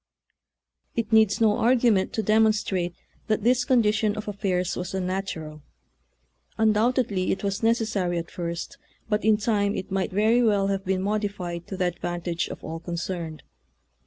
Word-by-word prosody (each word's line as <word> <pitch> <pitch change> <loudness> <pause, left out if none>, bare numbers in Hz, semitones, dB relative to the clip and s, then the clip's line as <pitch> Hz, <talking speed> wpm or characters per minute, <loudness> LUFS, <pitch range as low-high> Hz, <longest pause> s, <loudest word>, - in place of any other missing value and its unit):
It 230 -1 -2
needs 220 -2 +5
no 215 -2 +3
argument 230 -5 +3
to 220 - -1
demonstrate 210 -5 +2 0.3
that 215 -1 0
this 245 +2 +3
condition 215 -4 +2
of 215 0 -6
affairs 185 -3 -1
was 180 +2 -5
unnat 190 +1 -2
ural. 155 -1 -9 1.0
Undoubtedly 220 -2 +2
it - - -2
was 200 -1 -1
necessary 215 -6 +1
at 170 0 -5
first, 170 -1 -5 0.3
but 210 -1 0
in 215 -1 +4
time 205 -2 +1
it 190 - -5
might 190 -1 0
very 220 +5 +3
well 205 -4 +2
have 195 -1 -1
been 190 0 0
modified 200 -4 -3
to 190 - -6
the 185 - +1
advantage 175 -1 -2
of - - -9
all 165 +1 -5
con 170 +1 -5
cerned. 170 -3 -4
200 Hz, 160 wpm, -25 LUFS, 180-220 Hz, 1.0 s, needs